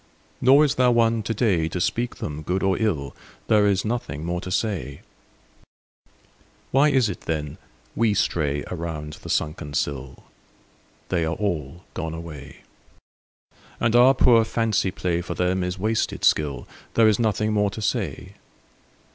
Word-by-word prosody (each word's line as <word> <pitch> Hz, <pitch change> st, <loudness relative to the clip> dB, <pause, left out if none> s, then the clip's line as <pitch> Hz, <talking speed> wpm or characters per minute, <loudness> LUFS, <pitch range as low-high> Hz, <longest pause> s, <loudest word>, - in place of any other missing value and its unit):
Nor 140 Hz, +4 st, +6 dB
is 140 Hz, -, +1 dB
there 125 Hz, -3 st, +3 dB
one 115 Hz, -1 st, +3 dB
today 100 Hz, -6 st, +1 dB
To 90 Hz, -, -4 dB
speak 120 Hz, +7 st, -1 dB
them 75 Hz, 0 st, -5 dB
good 90 Hz, +5 st, -2 dB
or 95 Hz, -1 st, +2 dB
ill: 75 Hz, -, -1 dB, 0.3 s
There 105 Hz, -1 st, +4 dB
is 100 Hz, 0 st, +1 dB
nothing 105 Hz, -, -3 dB
more 85 Hz, +1 st, -2 dB
to 95 Hz, -, -7 dB
say. 90 Hz, -, -2 dB, 1.7 s
Why 140 Hz, +3 st, +4 dB
is 130 Hz, -5 st, +3 dB
it 95 Hz, -, -5 dB
then 75 Hz, -3 st, -3 dB, 0.4 s
we 110 Hz, -2 st, +2 dB
stray 75 Hz, -6 st, 0 dB
Around 80 Hz, -3 st, -5 dB
the -, -, -9 dB
sunken 75 Hz, -2 st, -2 dB
sill? 65 Hz, -2 st, -3 dB, 0.9 s
They 90 Hz, -3 st, +1 dB
are 80 Hz, +1 st, -1 dB
all 85 Hz, -5 st, -3 dB
gone 80 Hz, -2 st, -4 dB
away. 75 Hz, -4 st, -9 dB, 1.2 s
And 115 Hz, 0 st, +1 dB
our 125 Hz, +3 st, +7 dB
poor 120 Hz, -3 st, +5 dB
fancy 110 Hz, -3 st, 0 dB
play 90 Hz, -2 st, -2 dB
For 85 Hz, -, -5 dB
them 90 Hz, +1 st, 0 dB
is 90 Hz, +1 st, -3 dB
wasted 110 Hz, +4 st, -1 dB
skill: 70 Hz, -5 st, +1 dB, 0.3 s
There 115 Hz, -1 st, +6 dB
is 110 Hz, 0 st, +3 dB
nothing 110 Hz, -1 st, +1 dB
more 105 Hz, -1 st, +2 dB
to 110 Hz, -, -7 dB
say. 100 Hz, -, -2 dB
95 Hz, 150 wpm, -24 LUFS, 80-115 Hz, 1.7 s, our